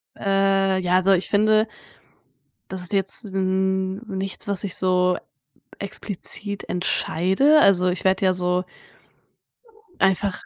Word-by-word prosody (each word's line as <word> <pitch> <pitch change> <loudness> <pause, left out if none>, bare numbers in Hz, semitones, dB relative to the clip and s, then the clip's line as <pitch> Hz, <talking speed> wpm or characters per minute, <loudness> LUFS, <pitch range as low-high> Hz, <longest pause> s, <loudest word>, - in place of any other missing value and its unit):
Äh, 195 -1 +1
ja 180 +1 +2
so, 195 +1 +4
ich 185 0 0
finde 215 +1 +3 1.0
das 190 -1 -5
ist 180 +3 -5
jetzt 195 +4 0
n 190 0 -1
nichts, 195 -1 -5
was 200 -2 -2
ich 195 -3 -4
so 180 -1 +1 0.6
explizit 200 0 -5
entscheide. 190 - +2
Also, 185 -8 +4
ich 180 -1 -2
werde 190 0 +2
ja 185 - +3
so 180 0 0 1.4
einfach 195 0 0
190 Hz, 120 wpm, -22 LUFS, 185-200 Hz, 1.4 s, so